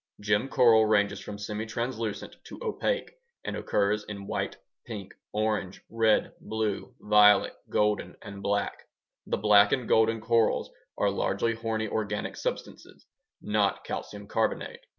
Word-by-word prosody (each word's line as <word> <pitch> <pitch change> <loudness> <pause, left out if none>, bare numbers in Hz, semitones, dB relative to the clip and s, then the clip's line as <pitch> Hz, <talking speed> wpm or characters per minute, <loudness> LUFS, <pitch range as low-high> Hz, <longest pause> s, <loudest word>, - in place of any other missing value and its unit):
Gem 105 +4 +1
coral 115 -4 +5
ranges 100 -1 +2
from 105 0 -7
semitranslucent 110 +2 -4
to - - -10
opaque 485 +2 -1 0.3
and - - -3
occurs 105 +1 0
in 100 -1 -7
white, - - -3 0.3
pink, 100 -4 -8 0.2
orange, 105 -3 -2
red, 110 -1 +2
blue, 110 -2 -3
violet, 105 0 +5 0.2
golden, 105 0 0
and 100 -1 -9
black. 100 0 -2 0.4
The - - 0
black 100 -1 +6
and 125 -3 0
golden 110 0 +3
corals 115 0 +1 0.3
are 100 - +2
largely 100 +3 0
horny 110 -1 -2
organic 105 -1 -3
substances, - - -6 0.4
not 105 -2 +1
calcium 105 0 -6
carbonate. - - -2
105 Hz, 130 wpm, -28 LUFS, 100-110 Hz, 0.4 s, black